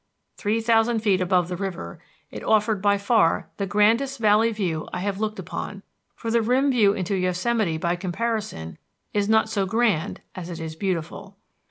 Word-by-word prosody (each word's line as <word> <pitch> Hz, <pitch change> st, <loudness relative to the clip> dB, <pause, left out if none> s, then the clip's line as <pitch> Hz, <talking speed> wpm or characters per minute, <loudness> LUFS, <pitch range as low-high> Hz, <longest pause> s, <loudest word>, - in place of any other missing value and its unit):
Three 220 Hz, +2 st, -1 dB
thousand 225 Hz, 0 st, +2 dB
feet 195 Hz, -4 st, +2 dB
above 180 Hz, -1 st, +2 dB
the 180 Hz, -, -4 dB
river, 190 Hz, -1 st, -5 dB, 0.3 s
it -, -, -7 dB
offered 215 Hz, -2 st, +2 dB
by 200 Hz, 0 st, +3 dB
far 200 Hz, -4 st, +2 dB
the 200 Hz, -, -2 dB
grandest 225 Hz, +7 st, +2 dB
valley 220 Hz, +1 st, +4 dB
view 180 Hz, -8 st, -3 dB
I 180 Hz, -, -4 dB
have 200 Hz, 0 st, -2 dB
looked 215 Hz, 0 st, -2 dB
upon, -, -, -6 dB, 0.3 s
for 230 Hz, -, -4 dB
the 235 Hz, 0 st, +3 dB
rim 255 Hz, +5 st, +2 dB
view 210 Hz, -6 st, +4 dB
into 195 Hz, -1 st, -2 dB
Yosemite 185 Hz, 0 st, 0 dB
by 170 Hz, +2 st, 0 dB
comparison 190 Hz, -, -3 dB, 0.3 s
is 205 Hz, 0 st, 0 dB
not 220 Hz, 0 st, +4 dB
so 200 Hz, -3 st, -1 dB
grand 220 Hz, -6 st, 0 dB
as 180 Hz, -2 st, -7 dB
it 170 Hz, -1 st, -6 dB
is 160 Hz, -1 st, -6 dB
beautiful. 190 Hz, +2 st, -4 dB
205 Hz, 175 wpm, -24 LUFS, 180-225 Hz, 0.3 s, valley